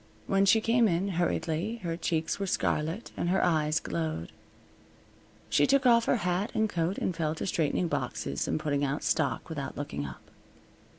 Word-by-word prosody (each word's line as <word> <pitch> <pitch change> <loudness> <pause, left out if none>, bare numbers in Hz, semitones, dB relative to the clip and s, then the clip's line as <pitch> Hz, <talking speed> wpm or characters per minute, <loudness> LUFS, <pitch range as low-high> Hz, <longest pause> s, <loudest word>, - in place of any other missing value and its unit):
When 195 0 +2
she 220 +3 +5
came 230 +1 +3
in, 185 +2 0
hurriedly, 175 +2 -1
her 165 -1 -2
cheeks 165 0 -1
were 195 - -2
scarlet 165 +4 -1
and 175 - -1
her 190 - +2
eyes 155 -3 +2
glowed. 80 -1 -3 1.2
She 145 - +3
took 275 -1 +3
off 235 -2 +5
her - - +3
hat 180 +4 0
and 220 0 +2
coat 175 -1 -1
and 180 - -1
fell 155 -2 -1
to - - -4
straightening 170 -1 0
boxes 70 - -2
and - - 0
putting 145 -2 0
out 140 +1 -1
stock 140 -7 0
without 150 -4 -5
looking 75 - -4
up. 65 - -12
165 Hz, 175 wpm, -29 LUFS, 150-195 Hz, 1.2 s, she